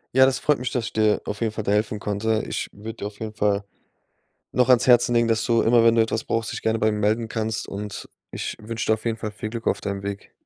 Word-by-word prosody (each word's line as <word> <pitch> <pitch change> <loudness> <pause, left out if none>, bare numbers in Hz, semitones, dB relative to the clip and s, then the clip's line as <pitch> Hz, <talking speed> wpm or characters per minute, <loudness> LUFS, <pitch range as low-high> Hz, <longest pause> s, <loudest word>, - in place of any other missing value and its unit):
Ja, 130 0 +8
das 130 0 +1
freut 150 -2 +2
mich, 125 0 -3
dass 125 -3 -1
ich - - -6
dir 110 -1 +2
auf 105 - -5
jeden 115 -2 +1
Fall 110 -1 -5
da 100 - +1
helfen 105 0 0
konnte. 110 +2 -1
Ich - - -3
würde 110 +2 -8
dir 100 - -5
auf 105 0 -12
jeden 110 -1 -5
Fall 100 -1 0 0.9
noch 125 0 +3
ans 125 0 +5
Herzen 120 -1 +5
legen, 120 -1 +3
dass 115 -1 +1
du 115 -2 +3
immer 115 0 +4
wenn 115 0 +5
du 115 - +5
etwas 110 0 -1
brauchst, 115 -1 -1
dich - - -5
gerne 110 0 0
bei 110 0 +3
mir 105 - -2
melden 110 +2 +1
kannst. 110 0 -3
Und 100 0 -6 0.2
ich - - -4
wünsche 115 +2 -4
dir 110 - +4
auf 110 - -4
jeden 115 -1 0
Fall 110 -1 -4
viel 105 +1 -6
Glück 115 0 -5
auf - - +1
deinem 100 -1 -3
Weg. 100 0 -6
110 Hz, 275 wpm, -24 LUFS, 105-115 Hz, 0.9 s, Ja